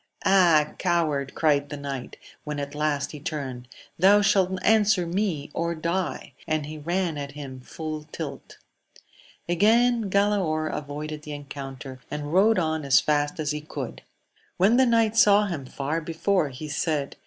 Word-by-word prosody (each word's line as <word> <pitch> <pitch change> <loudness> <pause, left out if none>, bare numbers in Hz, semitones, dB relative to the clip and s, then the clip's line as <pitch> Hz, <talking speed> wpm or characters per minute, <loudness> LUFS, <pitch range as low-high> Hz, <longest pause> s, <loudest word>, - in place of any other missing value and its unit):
Ah, 170 -6 +5
coward! 155 -6 0
cried 145 -2 +2
the 145 - -5
knight, 140 -3 -6 0.3
when 150 -1 -4
at 140 0 -5
last 150 -1 -1
he 150 - -8
turned, 135 -5 -5 0.3
thou 200 +4 +6
shalt 190 -2 +2
answer 215 -4 +4
me 170 -5 -2
or 170 0 -1
die! 170 +3 -3
and 155 -2 0
he 155 +1 -7
ran 170 0 -1
at 140 0 -6
him 140 -3 -8
again - - -13
full 155 +3 -6
tilt. - - -7 0.9
Again 225 +5 +3
Galaor 190 -6 +1
avoided 150 +1 -5
the 150 -1 -7
encoun 140 -2 -7
ter, 130 -1 -9
and 150 +1 -5
rode 215 +5 +5
on 160 -3 0
as 140 -1 +5
fast 145 0 0
as 150 -2 -1
he 150 0 -3
could. 140 -5 -7 0.6
When 205 +6 +4
the 260 -1 +5
knight 225 -1 +2
saw 210 -1 +6
him 155 -9 -5
far 145 +5 -3
before, 165 +1 0
he 140 +4 -8
said. 150 -1 -2
155 Hz, 165 wpm, -25 LUFS, 145-190 Hz, 0.9 s, thou